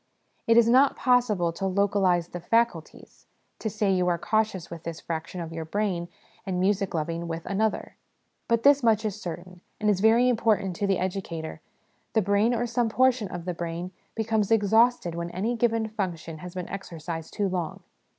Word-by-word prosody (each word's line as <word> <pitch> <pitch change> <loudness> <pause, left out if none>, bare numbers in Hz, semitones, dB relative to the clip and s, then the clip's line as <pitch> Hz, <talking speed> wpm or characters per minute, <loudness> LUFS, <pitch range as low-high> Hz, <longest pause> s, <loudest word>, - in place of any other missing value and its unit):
It 230 0 +5
is 235 -1 +6
not 260 +4 +5
possible 220 -9 +2
to 195 +3 -2
localise 190 -3 +2
the 175 - -6
'faculties' 230 -3 -1 0.3
to 220 - -2
say 205 -1 +1
you 180 -1 +1
are 175 -1 +2
cautious 215 -3 -1
with 170 -1 -7
this 165 -1 -6
fraction 170 +2 -5
of 165 -1 -6
your 165 0 -4
brain, 175 0 -2 0.4
and 185 -2 -2
music 195 0 +1
loving 165 +2 -2
with 165 0 -5
another; 210 +3 -1 0.5
but 230 0 +1
this 285 0 +6
much 220 -2 +3
is 215 0 -3
certain, 180 +1 -7 0.2
and 210 0 +3
is 190 - 0
very 225 +4 +5
important 215 -6 +1
to 200 - 0
the 195 -2 +2
educator: 180 -4 -4 0.5
the 220 - +3
brain, 205 +4 +2
or 240 0 0
some 235 0 0
portion 250 -2 +2
of 175 -2 -7
the 180 - -2
brain, 170 +1 -5 0.2
becomes 220 -2 0
exhausted 225 -3 +3
when 170 0 -4
any 210 +7 -2
given 230 -1 +1
function 175 -7 -4
has 180 +2 -9
been 180 -1 -4
exercised 165 -4 -6
too 205 -2 +1
long. 180 -4 -3
195 Hz, 180 wpm, -26 LUFS, 175-220 Hz, 0.5 s, is